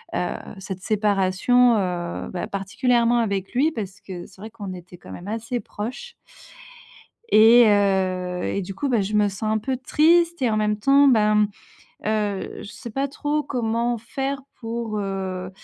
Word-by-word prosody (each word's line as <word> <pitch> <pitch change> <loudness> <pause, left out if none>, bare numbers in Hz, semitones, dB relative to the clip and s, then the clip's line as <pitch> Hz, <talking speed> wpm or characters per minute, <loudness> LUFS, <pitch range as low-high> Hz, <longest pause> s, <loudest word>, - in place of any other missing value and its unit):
heu, - - -1 0.2
cette 190 -1 -7
séparation. 210 +4 +3
Heu, 175 -3 -3
bah, 180 - -4
particulièrement 235 +4 +1
avec 200 -4 -2
lui 285 +6 +2
parce 205 -8 -6
c'est 180 -2 -9
vrai 215 +3 -8
qu'on 205 -4 -7
était 180 0 -11
quand - - -13
même 175 - -9
assez 230 +3 -3
proches 255 - -7 1.2
et 230 +3 +8
heu 185 -3 +1
et 200 - -1
du 190 +1 -7
coup 285 +5 -2
bah, 240 -3 +2
je 195 +2 -3
me 210 -1 +3
sens 195 +2 -8
un 215 0 +1
peu 260 +4 -2
triste 335 +5 +3
et 250 - +2
en 215 - +1
même 210 0 +1
temps 275 +6 +5
ben, 210 -4 +4 0.6
heu, 210 -2 -2
je 205 - -9
sais 235 +3 -9
pas 270 +5 -1
trop 295 +2 -1
comment 235 -3 -1
faire 270 +4 -4 0.2
pour, 225 -2 -4
heu, 190 -2 -4
215 Hz, 165 wpm, -23 LUFS, 195-245 Hz, 1.2 s, et